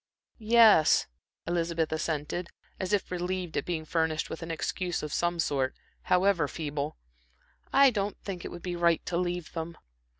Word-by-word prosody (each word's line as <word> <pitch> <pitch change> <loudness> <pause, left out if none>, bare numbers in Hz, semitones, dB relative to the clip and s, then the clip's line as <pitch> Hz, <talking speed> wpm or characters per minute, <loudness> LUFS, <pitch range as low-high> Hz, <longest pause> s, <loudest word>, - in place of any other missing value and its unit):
"Yes," 220 -7 +6 0.4
Elizabeth 170 -1 0
assented, 160 +2 -2 0.3
as 190 -1 -2
if 205 -3 0
relieved 180 -1 -3
at - - -1
being 165 -3 -2
furnished 160 -1 0
with 165 - -6
an 165 - -6
excuse 175 +2 -2
of 150 - -4
some 175 0 0
sort, 135 -5 0 0.3
however 180 -4 +3
feeble, 150 -1 -4 0.7
"I 275 -1 +6
don't 205 -2 -2
think 185 -3 -5
it - - -5
would 175 0 -9
be 180 -1 -3
right 170 -1 +2
to 175 - -3
leave 175 -2 -2
them." 165 0 -5
170 Hz, 160 wpm, -29 LUFS, 160-180 Hz, 0.7 s, Yes